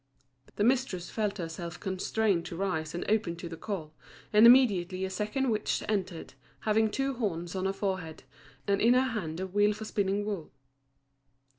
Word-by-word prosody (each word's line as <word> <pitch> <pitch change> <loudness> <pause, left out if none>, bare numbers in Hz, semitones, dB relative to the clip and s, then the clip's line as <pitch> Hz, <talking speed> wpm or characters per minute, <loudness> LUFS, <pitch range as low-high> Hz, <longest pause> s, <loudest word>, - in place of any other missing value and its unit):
The 205 - 0
mistress 235 -8 +1
felt 210 -2 -1
herself 170 0 -6
constrained 190 0 0
to 170 - -6
rise 165 -4 -2
and 175 - -3
open 210 -6 +1
to 170 +1 -7
the 165 - -7
call, 165 -4 -5 0.4
and 215 +2 +8
immediately 190 -7 +5
a 190 - -5
second 215 +7 -1
witch 215 -1 -1
entered, 185 -8 -3 0.3
having 220 0 +2
two 270 +5 -1
horns 175 -8 -3
on 190 0 -2
her 195 - +2
forehead, 185 -5 -3 0.4
and 200 0 +2
in 240 +3 +5
her 255 0 +2
hand 170 -7 -4
a 190 - -2
wheel 205 +2 +2
for 215 +1 -7
spinning 205 -1 0
wool. 200 -7 -4
200 Hz, 170 wpm, -30 LUFS, 175-215 Hz, 0.4 s, and